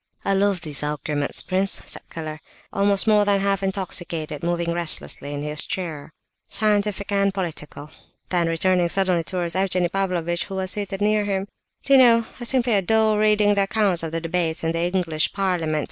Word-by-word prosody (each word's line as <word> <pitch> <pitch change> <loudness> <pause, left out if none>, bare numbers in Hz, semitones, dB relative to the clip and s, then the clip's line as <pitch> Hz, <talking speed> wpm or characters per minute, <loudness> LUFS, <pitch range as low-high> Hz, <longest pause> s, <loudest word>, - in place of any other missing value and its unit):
"I 195 - +2
love 195 -2 +1
these 150 -5 0
arguments, 150 -1 +1
prince," 190 +1 +2
said - - -1
Keller, 155 -2 -7 0.3
also 200 +2 +3
more 210 -1 +5
than 205 -1 +2
half 195 0 0
intoxicated, 175 -6 -3
moving 170 0 -1
restlessly 165 -4 -2
in 145 0 -4
his 150 0 -2
chair. 160 -5 -5 0.4
"Scientific 205 -1 0
and 200 0 +2
political." 155 -5 -6 0.4
Then, 170 -2 0
turning 180 0 +2
suddenly 185 -2 +1
towards 175 0 -3
Evgenie 185 -2 +1
Pavlovitch, 175 -3 -1
who 195 - -7
was 190 0 -2
seated 200 -1 -4
near 210 0 +2
him: 195 -1 -2 0.4
"Do 275 - +3
you 270 - +8
know, 230 -2 +5
I 240 - -6
simply 245 -2 +1
adore 215 +2 +2
reading 210 -1 +3
the 200 - +1
accounts 195 -4 +1
of 165 -1 -4
the 165 - -2
debates 165 -1 -1
in 165 - 0
the 165 - -2
English 165 -4 0
parliament. 180 -6 -1
185 Hz, 175 wpm, -22 LUFS, 165-200 Hz, 0.4 s, you